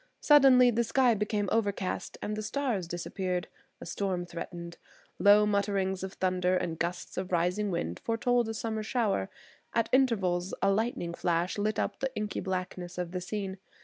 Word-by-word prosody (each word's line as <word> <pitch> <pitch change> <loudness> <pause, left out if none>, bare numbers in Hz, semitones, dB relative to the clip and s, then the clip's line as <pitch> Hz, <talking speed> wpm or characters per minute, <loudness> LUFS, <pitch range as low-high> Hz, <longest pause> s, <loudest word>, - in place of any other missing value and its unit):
Suddenly 265 -4 +7
the 235 +1 +1
sky 250 +1 +3
became 210 -1 -1
overcast 200 -4 -1
and 210 - -2
the 215 - -3
stars 220 -5 -2
disappeared. 180 +1 -3 0.3
A - - -8
storm 180 0 -2
threatened. 170 0 -7 0.4
Low 205 +1 +7
mutterings 200 -2 0
of 190 0 -5
thunder 185 0 +1
and 165 -2 -3
gusts 175 +1 -3
of 185 0 -3
rising 180 +4 +1
wind 85 - -2
foretold 240 0 +1
a 225 - -3
summer 220 0 -2
shower. 215 - 0 0.5
At 230 -1 +2
intervals 195 -9 +2
a 195 - +3
lightning 200 -5 -1
flash 175 +3 0
lit 215 +1 0
up - - -2
the 270 - -1
inky 210 -1 -2
blackness 180 -1 -4
of 175 -1 -3
the 180 0 -3
scene. 190 0 -4
195 Hz, 165 wpm, -30 LUFS, 180-220 Hz, 0.5 s, Suddenly